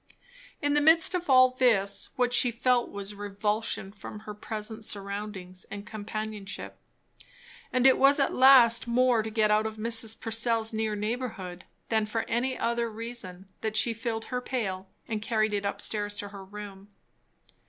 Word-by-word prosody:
In 290 0 +2
the 295 - +3
midst 320 +4 +5
of 355 -3 -3
all 255 -1 +7
this 225 -6 +3
what 250 -1 +1
she 245 0 +4
felt 240 +1 +1
was 200 0 -6
revulsion 205 0 -2
from 210 +1 -10
her 210 -1 -8
present 215 +1 -6
surroundings 200 -3 -5
and 200 +1 -7
companionship; 215 -1 -6 0.9
and 255 0 +1
it 265 - +6
was 275 +2 +6
at 275 - +1
last 250 -3 +6
more 245 -1 +3
to 220 - -5
get 215 -1 +1
out 215 +1 +3
of 220 0 -7
Mrs. 225 0 +2
Purcell's 225 0 0
near 220 -1 -1
neighbourhood 210 -5 -4 0.2
than 220 -1 +1
for 225 +1 -2
any 255 +3 -1
other 235 0 -1
reason 220 -5 -7 0.2
that 220 -1 -3
she 230 +2 +2
filled 225 0 -4
her 250 - -1
pail 195 -8 -4 0.2
and 215 -2 -3
carried 215 -1 0
it 200 0 -1
up 200 - -4
stairs 205 -1 -2
to 205 0 -4
her 200 -1 -10
room. 200 0 -10
220 Hz, 165 wpm, -28 LUFS, 205-240 Hz, 0.9 s, all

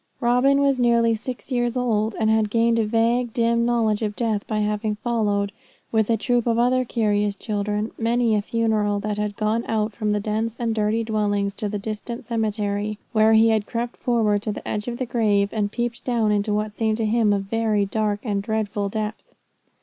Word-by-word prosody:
Robin 255 +3 +3
was 275 -2 +2
nearly 235 -1 +3
six 245 +4 -6
years 240 0 0
old, 220 -3 0
and 220 -1 +2
had 220 -1 +2
gained 230 +1 +2
a 220 - +2
vague, 235 +2 +1
dim 235 0 +2
knowledge 225 -3 +1
of 210 -2 -2
death 220 -4 -1
by 215 - -2
having 210 0 -1
followed, 210 -3 0 0.4
with 220 -1 +1
a 230 - +3
troop 240 +1 0
of 230 -1 +2
other 250 +2 +3
curious 210 -4 0
children, 210 +1 -2
many 235 0 +2
a 210 - +2
funeral 215 -2 0
that 210 0 -3
had 210 -1 -2
gone 220 +2 0
out 215 -1 -1
from 215 0 -1
the 210 - +1
dense 220 +2 -2
and 230 -2 0
dirty 220 +1 0
dwellings 205 -2 0
to 210 0 -4
the 210 - -2
distant 215 +3 -6
cemetery, 210 -2 -2
where 220 -1 +4
he 220 +1 +6
had 220 -2 +1
crept 240 0 -3
forward 220 -4 +1
to 215 - -2
the - - -7
edge 210 +1 -3
of 240 -1 -3
the 255 - -2
grave, 210 -4 +1
and 205 -2 -1
peeped 240 0 -3
down 230 -4 +1
into 205 +1 0
what 210 0 -1
seemed 220 0 0
to 225 - -1
him 220 -1 +2
a 205 - +3
very 210 +1 0
dark 210 0 -1
and 205 -4 -1
dreadful 210 -1 -2
depth. 215 +1 -5
220 Hz, 205 wpm, -23 LUFS, 210-235 Hz, 0.4 s, he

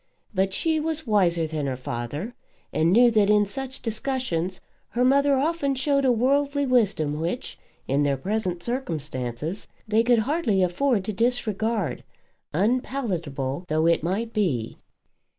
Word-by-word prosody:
But 190 0 +1
she 320 - 0
was 315 0 -2
wiser 180 -7 +2
than 155 -2 -3
her 130 - -1
father, 125 - -5 0.4
and 160 +2 +2
knew 240 +4 +6
that 210 -2 +3
in 210 0 +5
such 265 +6 -6
discussions 220 -7 -2 0.3
her 245 +1 +1
mother 280 +2 +4
often 285 -1 0
showed 275 +1 +1
a 255 - +5
worldly 280 +4 +2
wisdom 200 - +1
which, 170 +10 -4 0.3
in 140 +2 +1
their 140 -1 +1
present 185 +1 -2
circumstances, 155 - -4 0.2
they 215 +1 +3
could 240 +1 +4
hardly 275 - +1
afford 200 +3 +1
to 215 - -3
disregard, 220 -2 -1 0.5
unpalatable 180 - -1
though 155 0 +1
it 170 0 +3
might 205 +8 -2
be. 150 - -1
210 Hz, 140 wpm, -25 LUFS, 165-255 Hz, 0.5 s, knew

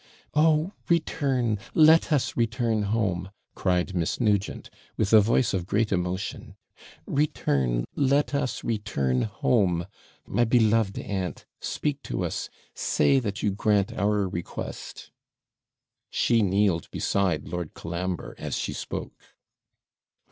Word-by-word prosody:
'Oh, 155 +3 +3 0.2
return! 135 -9 +1 0.2
let 160 +1 +6
us 145 -4 +1
return 115 -1 +1
home!' 95 -5 0 0.2
cried 90 +1 0
Miss 85 -3 -1
Nugent, 105 -4 0 0.3
with 110 0 0
a 110 - +9
voice 115 +3 +2
of 90 -2 -2
great 105 +2 +1
emotion. 90 0 -3 0.5
'Return, 70 - 0
let 140 +1 +2
us 130 -4 -1
return 95 - 0
home! 100 -5 +1 0.4
My 120 +4 +1
beloved 115 -3 +3
aunt, 95 -3 -4
speak 145 -2 -2
to 90 - -3
us! 85 - -3 0.2
say 135 -1 +2
that 100 -5 -4
you 105 - +2
grant 105 +1 +1
our 105 -2 +1
request!' 90 -2 -6 1.0
She 115 -2 +2
kneeled 95 -3 +1
beside 90 -7 0
Lord 85 -2 -5
Colambre, 85 +1 -4
as - - -3
she - - -3
spoke. - - -7
105 Hz, 120 wpm, -26 LUFS, 90-120 Hz, 1.0 s, a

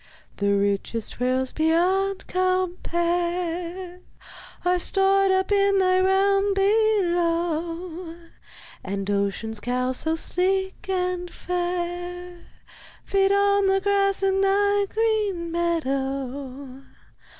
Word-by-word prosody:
The 200 0 +1
richest 200 +3 -2
pearls 255 +1 0
beyond 370 +5 +1
compare 355 -1 -1 0.7
Are 360 0 +2
stored 390 +1 +3
up 380 +1 +1
in 400 -1 +3
thy 370 -1 +3
realm 390 +1 +2
below, 345 -4 0 0.7
And 195 0 -4
Ocean's 200 +2 -2
cows 250 +3 -1
so 320 0 0
sleek 380 +4 -1
and 360 -1 -1
fair 355 0 -4 0.6
Feed 390 0 +2
on 400 0 +3
the 385 0 +3
grass 395 0 +1
in 385 0 +2
thy 405 +1 +2
green 425 -6 0
meadow. 275 -5 -3
355 Hz, 95 wpm, -24 LUFS, 325-390 Hz, 0.7 s, stored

